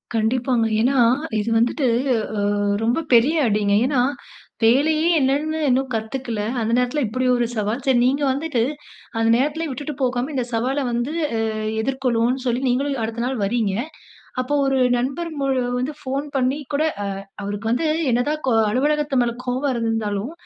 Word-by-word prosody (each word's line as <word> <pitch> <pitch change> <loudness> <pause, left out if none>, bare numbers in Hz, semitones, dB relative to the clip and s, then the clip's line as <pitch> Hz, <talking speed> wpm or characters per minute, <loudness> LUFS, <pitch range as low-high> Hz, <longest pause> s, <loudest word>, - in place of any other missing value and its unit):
கண்டிப்பாங்க. 235 +1 +1 0.2
ஏனா 265 +3 +2 0.4
இது 210 +2 -2
வந்துட்டு 245 +3 +1 0.7
ஆ - - -1 0.3
ரொம்ப 240 +7 +1
பெரிய 250 +8 +5
அடிங்க, 205 -1 +1
ஏனா 265 -2 +1 0.6
வேலையே 305 +8 +3
என்னன்னு 290 +4 0
இன்னும் 260 +1 +1
கத்துக்கல, 225 0 -3 0.2
அந்த 225 0 -1
நேரத்தில 250 +4 0
இப்டி 255 +4 -2
ஒரு 240 - +1
சவால். 215 +3 -2
சரி 265 -2 +3
நீங்க 275 +3 +2
வந்துட்டு 275 -3 -1 0.6
அந்த 225 0 +2
நேரத்திலேயே 300 +4 -1
விட்டுட்டு 290 +3 -5
போகாம 255 +2 0
இந்த 255 -3 -1
சவால 260 +5 0
வந்து 240 +5 -1 0.7
எதிர்கொள்வோன்னு 255 0 0
சொல்லி 245 +1 0
நீங்களும் 270 +1 0
அடுத்த 230 +1 -3
நாள் 255 0 -2
வர்றீங்க. 210 -1 0 0.7
அப்போ 255 +3 -1
ஒரு 270 0 +1 0.2
நண்பர் 275 +8 -2
மு 275 - -1 0.3
வந்து 265 +4 -2
ஃபோன் 270 +2 -3
பண்ணி 260 +2 +1 0.2
கூட 290 - +2 0.2
அ - - -2 0.4
அவருக்கு 205 +2 -3
வந்து 250 +7 +1 0.3
என்னதான் 290 +6 0
கோ 255 - +2 0.2
அலுவலகத்து 290 +2 +1
மேல 235 -1 -1
கோபம் 260 +3 0
இருந்தாலும். 225 +1 -2
255 Hz, 150 wpm, -22 LUFS, 230-275 Hz, 0.7 s, பெரிய